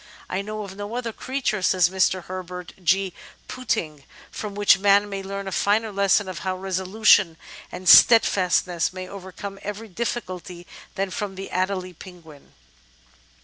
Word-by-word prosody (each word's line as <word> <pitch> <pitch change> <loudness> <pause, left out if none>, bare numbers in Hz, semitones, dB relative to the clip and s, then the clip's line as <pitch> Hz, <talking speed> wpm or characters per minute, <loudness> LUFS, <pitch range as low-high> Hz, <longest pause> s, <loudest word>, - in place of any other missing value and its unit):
"I 185 - -2
know 215 +1 -5
of 195 -1 -9
no 205 +3 -6
other 235 -2 -3
creature," 255 -6 -2
says 180 -1 +3
Mr. 185 -1 +1
Herbert 180 -1 -7
G. 190 +1 +2 0.3
Pouting, 175 - -3 0.3
"from 210 -2 -6
which 205 -1 +4
man 200 +1 +4
may 195 -1 -5
learn 195 0 -6
a - - -4
finer 215 +3 +1
lesson 200 0 +2
of 185 -3 -6
how 185 +1 -3
resolution 190 -1 +2 0.3
and 185 - -8
steadfastness 180 -6 +5
may 185 0 -7
overcome 195 +1 -9
every 210 +2 -6
difficulty 185 -5 -5 0.3
than 195 0 -2
from 200 0 -4
the 195 +1 -8
Adelie 185 0 -2
Penguin." 165 -5 -14
195 Hz, 145 wpm, -23 LUFS, 185-205 Hz, 0.3 s, steadfastness